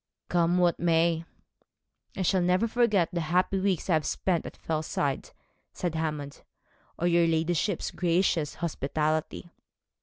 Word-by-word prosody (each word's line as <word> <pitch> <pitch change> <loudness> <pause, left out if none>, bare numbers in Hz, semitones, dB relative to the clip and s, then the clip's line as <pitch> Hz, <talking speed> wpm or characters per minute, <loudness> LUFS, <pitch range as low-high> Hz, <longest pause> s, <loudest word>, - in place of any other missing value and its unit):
'Come 175 0 +2
what 175 -1 +2
may, 165 -1 +2 0.9
I 190 - 0
shall 185 +1 +2
never 180 +5 +2
forget 215 -7 +2
the 170 - -1
happy 180 +4 +1
weeks 190 -3 0
I 180 - +2
have 155 -2 +1
spent 180 -3 -1
at - - -10
Fellside,' 155 -3 -2 0.4
said 175 -3 -3
Hammond, 150 -3 -4 0.6
'or 175 - -2
your 170 -1 +4
ladyship's 165 +3 0
gracious 170 -3 +1
hospitality.' 155 +1 -2
170 Hz, 130 wpm, -28 LUFS, 160-180 Hz, 0.9 s, your